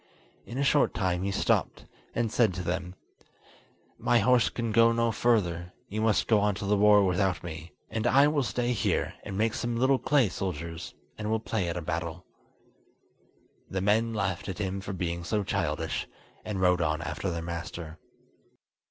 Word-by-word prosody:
In 120 - -6
a 140 - +1
short 140 +1 +3
time 90 -2 0
he 100 - -1
stopped, 100 - 0 0.3
and 115 -2 0
said 110 -6 +2
to 90 - -4
them: 90 +1 -3 1.0
"My 120 - +3
horse 125 -1 +4
can 115 -2 -3
go 115 +1 +5
no 115 0 +1
further; 90 -7 0 0.2
you 110 +2 -3
must 110 -2 +2
go 110 -2 +4
on 105 -1 +1
to 100 0 -5
the 105 +1 +2
war 105 0 +6
without 95 0 +1
me, 85 0 -8
and 110 +1 -2
I 140 +3 +6
will 150 -1 +1
stay 125 -1 -1
here, 105 - 0
and 95 - -6
make 110 +1 +1
some 120 -1 -2
little 130 +2 +3
clay 140 -6 +3
soldiers, 85 -3 -5 0.2
and 105 0 -3
will 110 0 +1
play 110 -5 -2
at 85 - -3
a 85 - -4
battle." 85 +3 -4 1.4
The 95 - -2
men 110 +4 +2
laughed 95 -4 -2
at 95 - -4
him 100 -1 -3
for 95 - -6
being 85 -1 -3
so 105 +4 -1
childish, - - -2 0.4
and 105 -3 -4
rode 90 -1 +3
on 80 0 0
after 75 +6 -3
their 85 -1 -3
master. 85 -1 -6
100 Hz, 180 wpm, -28 LUFS, 90-115 Hz, 1.4 s, war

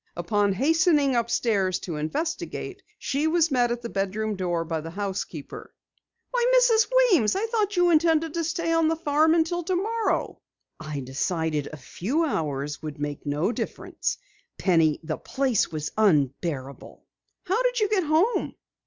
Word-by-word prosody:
Upon 200 +3 +1
hastening 295 - +3
upstairs 225 -5 +1
to 165 -4 -5
investigate, 235 - -4 0.2
she 285 +3 -1
was 330 -1 +2
met 245 -2 +2
at 240 0 -3
the - - -3
bedroom 210 +2 -2
door 175 -3 -1
by 160 -1 -3
the 165 - -7
housekeeper. 190 -5 -5 0.6
"Why, - - +1
Mrs. 460 -3 +4 0.2
Weems! 260 - +3
I 405 +3 0
thought 425 -4 -1
you 355 0 +4
intended 325 -1 +3
to 335 - -1
stay 330 +1 -1
on 330 -1 +3
the 325 - +1
farm 315 0 +2
until 340 +1 +1
tomorrow!" 390 +6 -1 0.4
"I 155 -3 -5
decided 150 +3 -2
a 155 - -9
few 235 - -2
hours 150 - -3
would 155 -2 -6
make 145 0 -5
no 150 +8 0
difference. - - -4 0.4
Penny, 165 -5 +2
the 155 -1 -3
place 260 -9 0
was 155 -1 -4
unbearable." 140 -7 -1 0.4
"How 385 +6 +1
did - - +1
you 425 - +2
get 400 -3 +1
home?" 325 +10 +1
235 Hz, 155 wpm, -25 LUFS, -, 0.6 s, Mrs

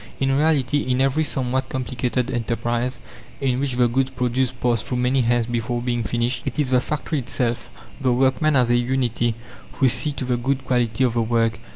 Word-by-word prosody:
In 135 0 +2
reality, 145 -2 +2
in 130 -2 -1
every 135 +4 +2
somewhat 130 -2 -1
complicated 125 0 -2
enterprise, 120 +1 -1 0.4
in 130 -2 0
which 140 -2 -1
the 125 -1 +4
goods 130 +3 0
produced 125 0 -1
pass 120 -3 +1
through 125 - -3
many 125 +2 +2
hands 120 0 +2
before 120 +1 -2
being 120 -1 -1
finished, 120 +3 -1
it - - -4
is 145 -4 0
the 125 - +5
factory 150 +2 -2
itself, 120 -1 -2 0.3
the 130 -2 +2
workmen 135 +4 +2
as 125 -2 +3
a - - +4
unity, 120 -2 0 0.4
who 135 - +2
see 150 +5 +3
to 130 - -4
the 125 -1 0
good 135 +3 -1
quality 120 -1 +1
of 125 -3 +2
the 120 - +1
work. 115 -1 +1
125 Hz, 195 wpm, -22 LUFS, 120-135 Hz, 0.4 s, the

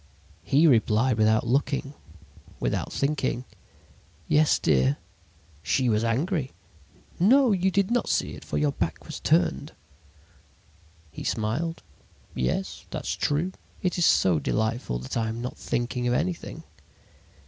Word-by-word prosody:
"He 145 +4 +3
replied 115 -3 +3
without 110 +1 +3
looking, 140 +2 0 0.7
without - - -2
thinking: 140 -3 -1 0.8
"'Yes, 155 0 +4
dear.' 65 +1 +2 0.6
"She 125 +9 +1
was 110 0 +2
angry. 135 - -1 0.7
"'No, 250 +7 +5
you 190 -1 +2
did 195 +2 +1
not 245 0 +1
see - - 0
it, - - -9
for 75 - -3
your 75 -1 +2
back - - -3
was - - -7
turned.' - - +1 1.4
"He - - -8
smiled. 135 +11 -2 0.5
"'Yes, 65 +9 -2
that's - - -4
true. 155 +6 0 0.3
It 180 -1 0
is 170 - +4
so 90 -4 +4
delightful 110 - -1
that 65 +1 -6
I 110 -1 0
am 115 +1 -4
not 125 +1 -5
thinking 125 +1 -2
of 120 - +2
anything.' 170 -1 -3
125 Hz, 130 wpm, -26 LUFS, 110-165 Hz, 1.4 s, No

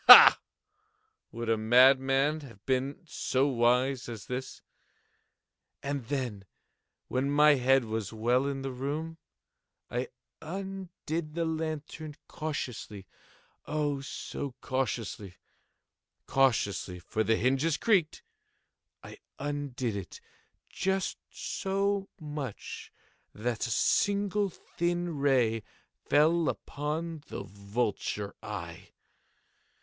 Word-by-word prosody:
Ha!—would 425 - +6
a 115 0 +3
madman 135 +5 +5
have 115 -9 -13
been 135 +6 -1
so 135 -4 0
wise 125 +1 +2
as 115 -3 -7
this? 125 +1 -5 1.2
And 140 -4 -3
then, 125 -8 -3 0.6
when 130 +2 0
my 150 +1 +6
head 135 -1 +3
was 110 -3 -3
well 120 +4 +2
in 135 -1 -3
the 135 - -3
room, 150 +6 -4 0.7
I 125 +1 -1 0.3
undid 170 -3 -5
the 170 -1 0
lantern 155 -1 -4
cautiously—oh, 145 - -5
so 140 -1 -5
cautiously—cautiously 110 -2 -2
(for 110 +5 -2
the 115 +1 +3
hinges 135 +7 +2
creaked)—I 190 -9 -3 0.2
undid 140 -5 -3
it 100 -3 -7 0.5
just 190 0 -1
so 195 0 -1
much 145 - -6 0.4
that 115 +2 -1
a - - -5
single 200 - +2
thin 175 -1 -2
ray 125 -5 +3 0.5
fell 160 +1 +4
upon 155 +4 -3
the - - -5
vulture 100 0 -2
eye. 85 -6 -7
135 Hz, 90 wpm, -30 LUFS, 120-160 Hz, 1.2 s, Ha!—would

